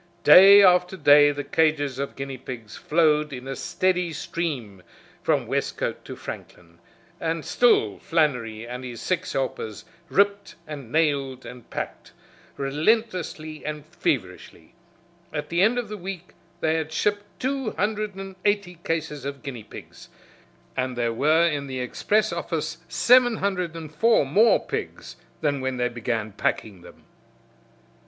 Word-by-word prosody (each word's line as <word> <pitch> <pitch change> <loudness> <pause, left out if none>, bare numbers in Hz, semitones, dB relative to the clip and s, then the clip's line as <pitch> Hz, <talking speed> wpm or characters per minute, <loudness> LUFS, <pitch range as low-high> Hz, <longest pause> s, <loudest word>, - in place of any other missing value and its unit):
Day 200 +2 +9
after 180 0 +4
day 145 -2 +7
the 145 0 -4
cages 145 -3 +1
of 140 - -4
guineapigs 130 -5 -7
flowed 150 -2 +2
in 130 -1 -7
a 135 - -4
steady 180 +1 0
stream 135 - -4 0.4
from - - +1
Westcote - - -2
to - - -7
Franklin, 85 -1 -10 0.4
and 165 -1 -2
still 110 - +3
Flannery 125 -9 0
and 125 +2 -7
his 120 -2 -7
six 180 -1 -2
helpers 115 -5 -3 0.2
ripped 200 +1 +1
and 140 -6 -8
nailed 140 -5 0
and 125 -1 -11
packed - - -6 0.4
relentlessly 155 +1 -1
and 150 -1 -5
feverishly. - - -4 0.6
At - - -4
the 170 +1 +1
end 220 +5 +4
of 240 -3 -2
the 210 0 -6
week 180 -1 -7 0.3
they 160 - +2
had 160 -1 -3
shipped 205 +5 0
two 265 -2 -1
hundred 210 -1 -2
and 195 0 -8
eighty 200 -4 0
cases 160 -3 -3
of 140 -1 -6
guinea 125 -6 -6
pigs, - - -12 0.7
and 130 -1 -2
there 120 -1 0
were 155 +7 +3
in 145 -3 -2
the 130 -1 -4
express 205 +12 0
office - - -3
seven 245 -2 +5
hundred 180 -4 -2
and 155 -2 -8
four 225 +1 +3
more 210 +12 +4
pigs - - -6 0.2
than 145 -3 0
when 130 -1 -2
they 125 0 0
began 115 -2 -3
packing 100 -1 -2
them. - - -16
155 Hz, 145 wpm, -24 LUFS, 130-185 Hz, 0.7 s, Day